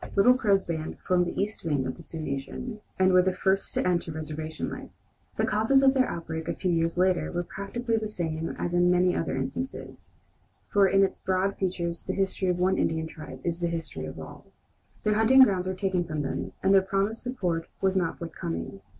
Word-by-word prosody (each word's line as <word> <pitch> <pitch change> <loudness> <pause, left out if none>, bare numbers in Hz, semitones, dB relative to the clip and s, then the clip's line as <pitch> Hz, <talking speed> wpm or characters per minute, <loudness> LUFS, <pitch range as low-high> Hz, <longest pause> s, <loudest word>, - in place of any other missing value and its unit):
Little 210 +5 +6
Crow's 200 -6 +2
band 160 -2 -4
formed 180 -1 +1
the - - -4
east 205 +2 -2
wing 145 -5 0
of 130 - -3
the - - -12
Sioux 165 - -7
nation, 155 - -5 0.2
and 185 0 +4
were 185 - +7
the 185 0 0
first 195 +1 +1
to - - +1
enter 175 -2 0
reservation 155 0 -5
life. - - -7 0.5
The - - +2
causes 225 +6 +3
of 265 -1 +6
their 260 -2 +2
outbreak, 160 -1 -5
a - - -1
few 180 - -1
years 165 0 +1
later, 185 0 +2
were 175 0 -1
practically 225 +6 -3
the 220 -1 -2
same 165 -5 -3
as 175 - -2
in 175 0 +4
many 180 0 +3
other 165 - -1
instances, 135 - -5 0.6
for 200 -2 +6
in 195 +1 +4
its 195 - -1
broad 190 +1 0
features 170 -3 -2
the 190 - -3
history 195 -1 -1
of 180 -1 +1
one 185 +1 +2
Indian 160 0 0
tribe 145 -5 -9
is 170 0 -2
the 175 - 0
history 165 - -4
of 75 - -8
all. - - -10 0.6
Their 210 - +2
hunting 230 +5 +7
grounds 185 -6 +2
were 185 - -2
taken 185 -2 0
from 155 -3 -3
them, - - -4
and 195 +1 +4
the 195 - +7
promised 195 +4 -1
support 180 -10 -2
was 190 0 +1
not 175 -3 0
forthcoming. 95 - -5
180 Hz, 210 wpm, -27 LUFS, 165-195 Hz, 0.6 s, were